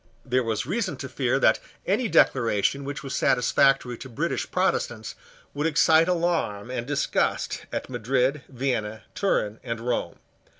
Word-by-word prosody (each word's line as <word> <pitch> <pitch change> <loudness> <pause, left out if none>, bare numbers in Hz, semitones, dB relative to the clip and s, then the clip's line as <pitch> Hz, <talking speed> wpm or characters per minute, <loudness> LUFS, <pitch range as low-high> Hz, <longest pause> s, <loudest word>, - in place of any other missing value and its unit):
There 130 0 +2
was 115 -2 -2
reason 210 - -2
to - - -6
fear - - 0
that - - +4 0.3
any 250 - +1
declaration 120 - +2
which 140 0 -5
was 135 - -4
satisfactory 125 0 +2
to 130 - -9
British 155 +8 -2
Protestants - - -1 0.4
would 145 +2 0
excite 160 +1 +4
alarm 165 - 0
and 120 -1 -4
disgust 145 -1 -1
at - - -3
Madrid, 130 +3 0
Vienna, 120 -5 -2
Turin, 110 - 0
and 115 -2 -4
Rome. 120 +1 -2
130 Hz, 140 wpm, -25 LUFS, 120-150 Hz, 0.4 s, that